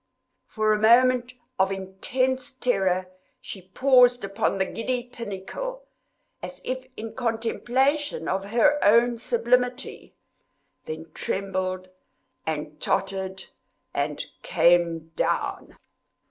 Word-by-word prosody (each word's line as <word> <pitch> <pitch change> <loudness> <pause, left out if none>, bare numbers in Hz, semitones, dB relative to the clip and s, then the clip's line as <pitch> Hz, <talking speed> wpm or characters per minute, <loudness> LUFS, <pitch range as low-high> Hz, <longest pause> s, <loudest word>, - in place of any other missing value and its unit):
For 215 -1 +1
a 210 - 0
moment 250 +2 +4 0.2
of 190 0 +3
intense 250 +7 -1
terror 190 -8 0 0.3
she 190 - -8
paused 250 -3 +5
upon 195 0 0
the 190 - +1
giddy 245 +3 -1
pinnacle, 245 - -6 0.6
as - - -7
if 260 0 -4
in 225 0 -6
contemplation 245 - 0
of 190 +1 -1
her 265 +8 +3
own 235 +2 +4
sublimity, 250 +2 0 0.7
then 160 0 -7
trembled 185 -1 -3 0.6
and 150 -1 -4
tottered, 190 0 -2 0.5
and—came 170 -1 +1
down. - - -1
225 Hz, 95 wpm, -25 LUFS, 190-250 Hz, 0.7 s, paused